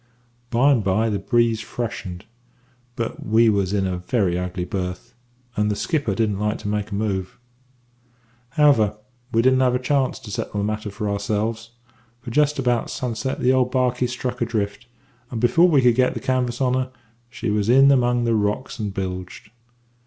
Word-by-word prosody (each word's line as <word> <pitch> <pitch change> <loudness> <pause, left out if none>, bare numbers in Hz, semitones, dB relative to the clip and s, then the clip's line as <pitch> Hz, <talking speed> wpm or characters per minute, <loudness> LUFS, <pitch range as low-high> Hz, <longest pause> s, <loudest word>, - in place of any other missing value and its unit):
"By 125 +5 +4
and 120 -6 +2
by 105 +4 +1
the 100 - -1
breeze 115 -2 +1
freshened; 100 -6 -5 0.7
but 115 -3 -4
we 110 +2 +4
was 100 -3 +1
in 100 -2 +1
a 90 -1 -2
very 90 -2 0
ugly 90 0 -3
berth, 90 +5 -5 0.4
and 105 -1 +1
the 105 - 0
skipper 145 - -1
didn't 105 -1 0
like 105 0 0
to - - -7
make 105 0 -2
a 100 - -4
move. 95 -3 -2 1.1
"However, 120 -7 +3 0.3
we 115 0 +2
didn't 130 0 +4
have 125 -1 +3
a - - +3
chance 130 +1 0
to 105 - -9
settle 105 - -4
the - - 0
matter 105 0 -2
for 105 +1 -4
ourselves, 110 +3 -2 0.5
for 120 0 -8
just 150 +2 +2
about 125 -3 0
sunset 125 +1 -3
the 130 - +4
old 130 -1 +2
barkie 125 -1 +1
struck 125 0 -4
adrift, 110 -1 -2 0.4
and, 120 - -4
before 125 +10 +5
we 140 -6 +4
could 120 -1 +5
get 125 +1 +2
the - - -3
canvas 125 -1 -1
on 125 -1 +2
her, 130 0 -1 0.4
she 115 -2 -3
was 105 0 0
in 135 +3 +7
among 120 -2 +2
the 115 -1 +1
rocks 110 +4 -1
and 105 -3 -4
bilged. 95 +1 -5
115 Hz, 180 wpm, -22 LUFS, 105-125 Hz, 1.1 s, in